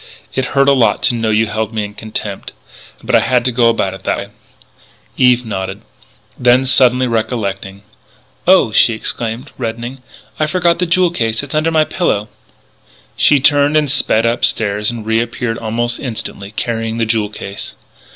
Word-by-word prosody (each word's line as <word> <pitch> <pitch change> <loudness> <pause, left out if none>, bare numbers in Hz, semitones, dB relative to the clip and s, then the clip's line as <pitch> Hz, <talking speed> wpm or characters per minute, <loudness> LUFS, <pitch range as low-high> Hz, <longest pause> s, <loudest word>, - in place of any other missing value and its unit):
"It 130 - -1
hurt 140 0 +4
a - - +6
lot 125 -4 +2
to 120 - +3
know 115 -1 -1
you 110 +1 +2
held 110 0 -3
me 105 -1 -1
in 105 - -9
contempt. 105 -2 -6 0.5
But - - -3
I - - +7
had 125 -1 +1
to 130 - +2
go 120 -1 +3
about 100 -4 0
it 95 - -10
that - - -1
way." 100 - -6 0.9
Eve 125 -1 +3
nodded. 95 -2 -5 0.6
Then, 125 +1 +4
suddenly 130 0 +4
recollecting: 100 -4 -3 0.6
"Oh," 185 -11 +5
she 115 +2 +4
exclaimed, 115 +4 -3
reddening, 120 +2 -5 0.4
"I 155 - +1
forgot 170 0 +1
the 180 - 0
jewel 175 +1 +2
case! 115 -6 -1
It's 145 - -7
under 155 +1 +1
my 160 -1 +3
pillow 105 - -1 0.4
" - - -31
She 145 - +4
turned 145 +2 +4
and 150 -3 +1
sped 115 -6 +2
upstairs 105 -3 +1
and 115 -2 -6
reappeared 115 +1 -1
almost 115 +1 -2
instantly, 110 -5 -5
carrying 115 +1 -3
the 115 - +1
jewel 110 -2 0
case. 100 -1 -8
115 Hz, 170 wpm, -15 LUFS, 110-130 Hz, 0.9 s, I